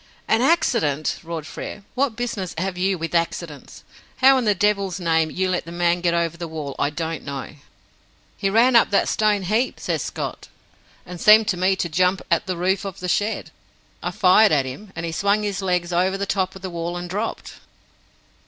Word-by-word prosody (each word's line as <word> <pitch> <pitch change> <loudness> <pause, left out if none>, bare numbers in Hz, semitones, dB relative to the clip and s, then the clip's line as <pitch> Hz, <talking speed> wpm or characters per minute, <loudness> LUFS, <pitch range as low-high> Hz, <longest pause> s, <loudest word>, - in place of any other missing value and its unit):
"An 225 - +3
accident!" 230 - +1
roared 165 -2 -6
Frere. 200 - -7
"What 260 -3 0
business 225 -6 -4
have 185 +2 -2
you 190 +1 0
with 165 +1 -5
accidents? 170 -3 -3 0.3
How, 270 +1 +6
in 245 - -2
the 210 -1 +3
devil's 200 -1 0
name, 165 -2 +1
you 185 +3 -1
let 180 - -1
the 170 - -9
man 175 0 +1
get 170 -1 +1
over 170 -1 0
the 170 0 -5
wall, 155 -3 -5
I 145 - +2
don't 160 +1 -4
know." 140 -1 -6 0.8
"He 195 - -1
ran 235 +5 +4
up 230 - +6
that 200 - +2
stone 210 -2 +1
heap," 220 +7 0
says - - -2
Scott, - - -5 0.6
"and 180 -1 -9
seemed 215 0 +7
to 185 - +1
me 185 +2 +2
to 180 - -2
jump 180 +3 +1
at 170 - +2
the 185 -2 -2
roof 185 +3 0
of 195 -3 -6
the 180 - -4
shed. 210 +4 -1 0.5
I - - -2
fired 205 +3 +5
at 140 -3 +2
him, 190 +11 -8
and 165 +1 -4
he 165 - -3
swung 200 +5 +1
his 205 -2 -2
legs 180 -2 -1
over 185 +3 +1
the 200 - -2
top 190 -1 -1
of 190 - -12
the 185 - -4
wall 170 +1 -4
and 175 0 -5
dropped." 205 +5 -5
185 Hz, 205 wpm, -22 LUFS, 170-205 Hz, 0.8 s, seemed